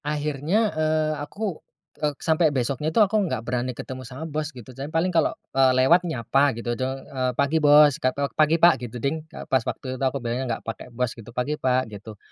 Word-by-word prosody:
Akhirnya, 150 +8 0
eee, 155 0 +1
aku, 195 +3 -5 0.4
ek 150 -2 -1
sampai 160 0 +3
besoknya 135 +4 -1
itu 160 - -5
aku 210 +2 +2
nggak 130 -7 -3
berani 125 +1 -2
ketemu 130 0 -7
sama 130 +6 -8
bos, 155 -1 -3
gitu. 130 -4 -12
Jadi 135 +3 -6
paling 165 +3 0
kalau, 165 -2 +3 0.2
eee, 135 -1 +5
lewat, 160 +8 +5
nyapa, 135 0 +1
gitu, 120 0 -2
jo 130 +2 -2 0.2
eee, 130 -2 -2
"Pagi, 145 +3 +2
Bos!" 145 -1 +6
Kato, 135 +2 0
"Pagi, 155 +1 +3
Pak!" 170 -6 +5
gitu 120 0 -6
ding. 140 +6 -2
Ke - - -9
pas 130 - +2
waktu 130 +2 -5
itu - - -3
aku 140 - -4
bilangnya 120 0 -2
nggak - - -19
pakai 115 +2 -6
bos, 125 0 -2
gitu. 115 -1 -12
"Pagi, 125 +4 -1
Pak!" 130 0 +2
gitu. 105 +1 -10
140 Hz, 210 wpm, -24 LUFS, 125-155 Hz, 0.4 s, Bos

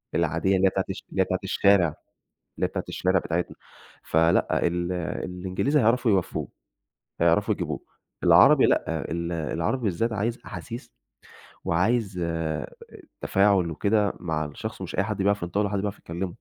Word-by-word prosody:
العادية 85 +3 +1
اللي 95 +1 +4
هي - - +4
بتاعة 95 0 -2
الش 95 - -5
اللي 95 - 0
هي - - +3
بتاعة 95 0 -1
الشارع 100 -1 +4 0.7
اللي - - -1
هي - - -7
بتاعة - - -4
الشارع 95 0 +1
بتاعتنا، 85 0 -3 0.5
فلأ، 80 +1 +2
ال 85 +1 -1 0.3
الإنجليزي 95 +11 0
هيعرفوا 120 +1 +3
يوفّوه، 95 -4 0 0.7
هيعرفوا - - +3
يجيبوه، - - -3 0.4
العربي - - +7
لأ، 80 -1 0
ال 85 +1 -2
العربي 85 - -2
بالذات 110 +3 0
عايز 115 +3 -1
أحاسيس 120 - -8 0.7
وعايز 100 +2 +1
آآ، 80 -3 -3 0.5
تفاعُل 95 -3 +3
وكده، 100 +6 +1
مع 80 -3 -2
الشخص 75 - -7
ومش - - -6
أي 100 - +2
حد 105 0 -3
بيعرف 100 0 +1
ينطقُه 90 +4 -1
ولا 105 - +1
حد 100 - -1
بيعرف 100 0 -3
يتكلّمُه. 85 +3 -4
95 Hz, 155 wpm, -25 LUFS, 85-100 Hz, 0.7 s, العربي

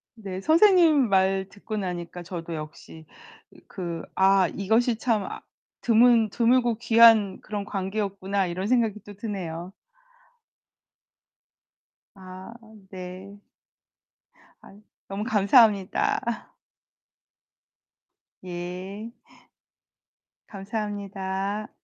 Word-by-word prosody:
네, 195 -4 -7
선생님 325 - +5
말 190 0 +2
듣고 215 +2 -7
나니까 175 -2 -5
저도 170 -1 -6
역시 155 +1 -10 0.6
그 170 -3 -6
'아 190 -1 +4
이것이 225 +4 +1
참 225 -4 0
아 - - -7 0.4
드문 230 -1 +4
드물고 240 +1 +2
귀한 225 -4 +5
그런 205 -2 -5
관계였구나.' 195 -1 -2
이런 185 +3 -4
생각이 225 -4 +1
또 205 - -10
드네요. 185 -5 -6 2.4
아 185 +2 -11 0.4
네. 185 +1 -9 1.3
아. - - -16 0.3
너무 200 +2 -4
감사합니다. 210 -3 +3 2.3
예. 185 +5 -7 1.4
감사합니다. 200 -1 -4
200 Hz, 165 characters per minute, -25 LUFS, 185-220 Hz, 2.4 s, 선생님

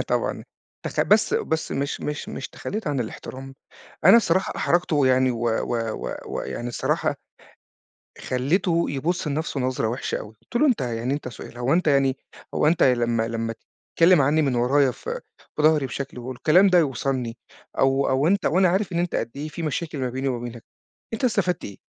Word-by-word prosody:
آه - - +1
طبعًا - - -1 0.4
تخ - - -2
بس - - +3
بس 160 - -1
مش 140 +1 -2
مش 150 0 -4
مش - - -6
تخلّيت 215 -2 -6
عن 145 -3 0
الإحترام، 130 +3 -7 0.5
أنا 190 +7 +9
الصراحة 190 -5 +2
أحرجته 175 -2 +1
ويعني 130 -2 +4
و 120 - -3
و 115 0 -1
و - - -4
و - - -4
يعني 120 - -5
الصراحة 120 - 0 1.0
خلّيته 170 +7 +1
يبُص 160 +5 -1
لنفسه 150 -1 -2
نظرة 125 -3 0
وِحشة 120 +4 -2
أوي، 105 - -10
قُلت - - -6
له: 300 - +4
"أنت 250 - +2
يعني 120 +1 -1
أنت 145 -3 -5
سؤال 120 0 -10
هو 120 +3 +1
أنت 175 -1 +2
يعني 135 -2 +3 0.4
هو - - +2
أنت 160 +2 +3
لما 120 -3 +2
لما 115 0 -3 0.4
تتكلم 170 0 +6
عنّي 150 +4 +3
من 135 -4 +1
ورايا 130 +3 +3
ف - - -11 0.5
في - - 0
ضهري 155 -2 +4
بشكل 130 +1 -6
والكلام 155 +10 +3
ده 180 -1 +5
يوصلني 130 -5 -1 0.4
أو 135 +1 +3
أو 135 +3 +2
أنت 195 +2 +2
وأنا 185 +3 +4
عارف 190 +2 0
إن 170 - -1
أنت 175 0 -1
قد 115 - -1
إيه 150 +2 -4
في 165 +2 -7
مشاكل 155 0 -3
ما 130 -2 -1
بيني 130 +2 -2
وما 125 -2 -1
بينك، 120 -1 -8 0.5
أنت 225 - -3
استفدت 185 -7 +1
إيه؟" 100 - -8
140 Hz, 190 wpm, -24 LUFS, 125-170 Hz, 1.0 s, أنا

